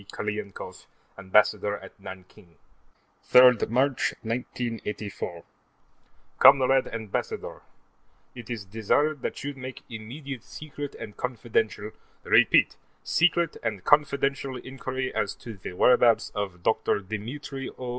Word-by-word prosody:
Krylenkoff, 105 Hz, -1 st, -6 dB, 0.3 s
Ambassador 105 Hz, +1 st, +2 dB
at -, -, -12 dB
Nanking:_ 95 Hz, -3 st, -12 dB, 0.7 s
3 125 Hz, -3 st, +7 dB
March, 130 Hz, +2 st, +1 dB
1984 110 Hz, -6 st, -4 dB, 1.0 s
Comrade 135 Hz, 0 st, +6 dB
Ambassador: 110 Hz, -3 st, -4 dB, 0.7 s
It 120 Hz, -2 st, -10 dB
is 115 Hz, -5 st, -4 dB
desired 120 Hz, +8 st, 0 dB
that -, -, -4 dB
you 145 Hz, +1 st, -3 dB
make 130 Hz, -1 st, -8 dB
immediate 125 Hz, +4 st, -7 dB
secret 145 Hz, -2 st, -8 dB
and 105 Hz, -3 st, -9 dB
confidential 110 Hz, -3 st, -2 dB, 0.3 s
repeat -, -, +4 dB, 0.3 s
secret 170 Hz, -1 st, +2 dB
and 105 Hz, -5 st, -3 dB
confidential 140 Hz, -2 st, +2 dB
inquiry 130 Hz, 0 st, -5 dB
as 100 Hz, -1 st, -1 dB
to 115 Hz, -, -9 dB
the 90 Hz, -, -7 dB
whereabouts 120 Hz, +3 st, +4 dB
of 95 Hz, -4 st, -4 dB
Dr. 110 Hz, -, +1 dB
Dimitri 130 Hz, +7 st, -6 dB
O. 125 Hz, -1 st, -5 dB
120 Hz, 105 wpm, -26 LUFS, 105-135 Hz, 1.0 s, 3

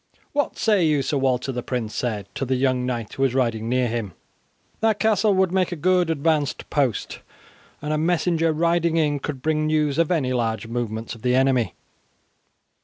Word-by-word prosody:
"What 290 Hz, 0 st, -1 dB
say 210 Hz, -6 st, +3 dB
you, 150 Hz, -3 st, +2 dB
Sir 145 Hz, 0 st, 0 dB
Walter?" 130 Hz, 0 st, 0 dB
the 125 Hz, -1 st, -3 dB
prince 120 Hz, -4 st, -3 dB
said 110 Hz, -5 st, -2 dB
to -, -, -3 dB
the 130 Hz, 0 st, 0 dB
young 130 Hz, -1 st, +1 dB
knight 120 Hz, -4 st, -3 dB
who -, -, -5 dB
was 135 Hz, -2 st, +2 dB
riding 115 Hz, -3 st, 0 dB
near 125 Hz, 0 st, +2 dB
him. 110 Hz, -5 st, -3 dB, 0.7 s
"That 220 Hz, -2 st, +2 dB
castle 215 Hz, -2 st, +3 dB
would 190 Hz, -2 st, +2 dB
make 185 Hz, -1 st, +1 dB
a -, -, -2 dB
good 180 Hz, +1 st, +2 dB
advanced 155 Hz, -2 st, 0 dB
post, 135 Hz, -7 st, -1 dB, 0.6 s
and 150 Hz, +1 st, -1 dB
a 155 Hz, -, 0 dB
messenger 165 Hz, 0 st, +1 dB
riding 170 Hz, +1 st, +1 dB
in 150 Hz, -3 st, +1 dB
could 135 Hz, -2 st, -5 dB
bring 155 Hz, -1 st, +1 dB
news 155 Hz, -1 st, +1 dB
of 165 Hz, -, +2 dB
any 145 Hz, -8 st, +1 dB
large 115 Hz, -3 st, -1 dB
movements 115 Hz, -1 st, -4 dB
of 115 Hz, -, -12 dB
the 125 Hz, +1 st, +2 dB
enemy." 130 Hz, -3 st, +2 dB
140 Hz, 185 wpm, -23 LUFS, 125-165 Hz, 0.7 s, say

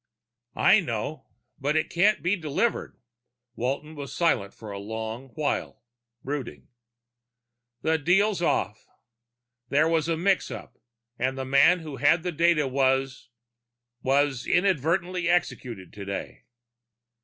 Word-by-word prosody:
"I -, -, +5 dB
know. -, -, -4 dB, 0.3 s
But 145 Hz, +3 st, 0 dB
it 155 Hz, -, 0 dB
can't 200 Hz, +5 st, +3 dB
be 180 Hz, +4 st, +2 dB
delivered." 165 Hz, +7 st, -1 dB, 0.6 s
Walton 140 Hz, +6 st, -3 dB
was 140 Hz, -3 st, -7 dB
silent 125 Hz, -, 0 dB
a 105 Hz, -3 st, -7 dB
long 110 Hz, +4 st, -5 dB
while, 155 Hz, -2 st, -2 dB, 0.4 s
brooding. 140 Hz, -2 st, -5 dB, 1.1 s
"The 160 Hz, 0 st, +2 dB
deal's 190 Hz, +4 st, +2 dB
off. 105 Hz, -, -1 dB, 0.8 s
There 150 Hz, +3 st, +3 dB
was 165 Hz, -1 st, +1 dB
a 165 Hz, -, +1 dB
mix 190 Hz, +3 st, +1 dB
up -, -, -8 dB, 0.4 s
and 130 Hz, +2 st, 0 dB
the 130 Hz, -, -3 dB
man 140 Hz, +7 st, +5 dB
who 150 Hz, -4 st, -7 dB
had 160 Hz, +5 st, +3 dB
the 180 Hz, -, -1 dB
data 165 Hz, -2 st, +3 dB
was 135 Hz, -1 st, 0 dB, 0.7 s
was 135 Hz, -1 st, +1 dB
inadvertently 175 Hz, 0 st, +1 dB
executed 120 Hz, -, -1 dB
today." 100 Hz, -1 st, -6 dB
145 Hz, 120 wpm, -26 LUFS, 130-170 Hz, 1.1 s, I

